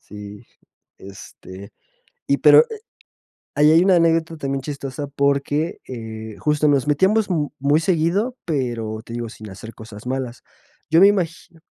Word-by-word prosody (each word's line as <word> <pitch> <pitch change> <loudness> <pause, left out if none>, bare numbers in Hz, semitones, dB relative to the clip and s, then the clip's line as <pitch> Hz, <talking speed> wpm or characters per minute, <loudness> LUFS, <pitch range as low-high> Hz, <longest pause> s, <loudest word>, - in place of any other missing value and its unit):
Sí, 105 0 -11 0.5
este, 95 0 -12 0.6
y - - +2
pero - - +7
eh, 435 -1 -8 0.8
ahí 150 +1 +5
hay 165 +2 +6
una 190 -2 +5
anécdota, 165 -1 +2
también, 135 -1 -3
chistosa, 140 0 -6
porque, 140 +3 -1
eh, 110 -3 -7
justo 150 0 +1
nos 140 -1 +2
metíamos 195 +8 +2
m 150 -5 0
muy 145 +3 +2
seguido, 185 +9 0
pero, 120 -8 -3
te 115 - -9
digo, 120 -1 -4
sin 110 -2 -11
hacer 110 +4 -10
cosas 110 +1 -12
malas. 130 -2 -4 0.5
Yo 165 - +5
me 195 - +8
imagino. 170 -4 -2
140 Hz, 150 wpm, -21 LUFS, 115-165 Hz, 0.8 s, me